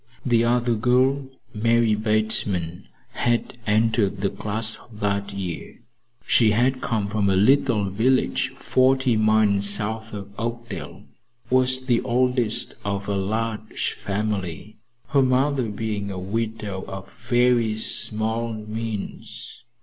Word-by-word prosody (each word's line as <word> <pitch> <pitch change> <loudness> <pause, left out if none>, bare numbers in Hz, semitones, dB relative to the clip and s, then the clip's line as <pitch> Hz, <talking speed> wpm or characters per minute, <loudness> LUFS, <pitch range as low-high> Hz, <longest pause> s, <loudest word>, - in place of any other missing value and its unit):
The 120 -3 +3
other 120 0 +2
girl, 130 +4 +2 0.3
Marie 115 +1 +2
Bateman, 105 -5 -1 0.2
had 120 0 -1
entered 110 -2 +2
the 100 -2 0
class 110 +2 0 0.2
that 100 -1 -2
year. 95 -4 -6 0.5
She 115 - +4
had 130 +4 +2
come 110 -3 -1
from 105 -1 0
a 95 - +3
little 120 +1 +3
village 120 +7 +1
forty 130 -1 +2
miles 110 -2 +3
south 110 +2 -2
of 100 -1 -7
Oakdale, 115 -2 -5 0.5
was 130 0 +2
the 125 -3 +1
oldest 125 -2 0
of 100 0 -3
a 100 - -1
large 110 +3 -2
family, 100 0 -4 0.3
her 140 -2 +4
mother 130 -1 +2
being 105 -1 -3
a 95 - -5
widow 105 0 -3
of 95 0 -8 0.2
very 120 -3 +3
small 110 +1 0
means. 110 +1 -6
110 Hz, 120 wpm, -23 LUFS, 100-120 Hz, 0.5 s, She